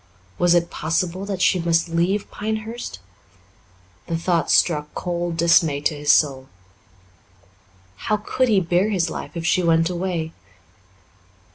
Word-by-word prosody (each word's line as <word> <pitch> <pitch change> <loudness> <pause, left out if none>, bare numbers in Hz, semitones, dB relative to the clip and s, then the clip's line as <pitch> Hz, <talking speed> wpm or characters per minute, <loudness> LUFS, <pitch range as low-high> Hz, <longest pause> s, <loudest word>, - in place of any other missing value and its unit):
Was 175 0 +4
it 170 0 +1
possible 175 +4 -2
that 190 -3 -2
she 185 - +3
must 165 0 +1
leave 175 +5 -1
Pinehurst? 220 - -5 1.1
The 165 - -1
thought 170 0 0
struck 150 -3 +2
cold 175 -1 -3
dismay 165 -3 +3
to 150 - +1
his 145 0 +2
soul. 135 -3 +2 1.5
How 215 - -1
could 255 +5 -1
he 205 -3 +4
bear 180 +3 +1
his 175 -6 0
life - - -7
if 165 - -4
she 180 - +2
went 165 0 +2
away? 175 -3 -3
170 Hz, 135 wpm, -22 LUFS, 165-190 Hz, 1.5 s, Was